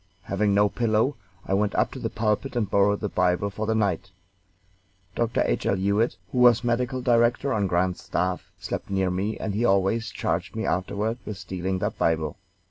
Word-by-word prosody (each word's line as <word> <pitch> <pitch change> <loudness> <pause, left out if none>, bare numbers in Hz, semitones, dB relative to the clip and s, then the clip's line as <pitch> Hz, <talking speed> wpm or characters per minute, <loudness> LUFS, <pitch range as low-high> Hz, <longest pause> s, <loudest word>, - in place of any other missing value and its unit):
Having 100 0 +1
no 105 +1 +5
pillow, 115 +5 +1 0.3
I - - -2
went 100 +1 +1
up - - +2
to - - -7
the - - -2
pulpit 110 +5 -1
and 115 -4 +1
borrowed 100 +1 +2
the 105 - 0
Bible 90 +1 +1
for 110 +2 -4
the 110 - +1
night. 95 -4 0 1.0
Dr. 115 +1 +1
H. - - -1
L. - - +3
Hewitt, 100 +5 +1 0.2
who 125 - -1
was 120 -1 +6
medical 125 +1 0
director 120 +3 +3
on 105 -3 +1
Grant's 90 0 0
staff, 90 0 -2
slept - - -5
near 95 -2 +1
me, 100 +4 -2
and 105 - -3
he 110 +4 0
always 100 +1 +2
charged - - -2
me - - -2
afterward 100 +6 -1
with 105 - -6
stealing 95 0 -3
that - - -3
Bible. 80 -2 0
105 Hz, 190 wpm, -25 LUFS, 95-115 Hz, 1.0 s, was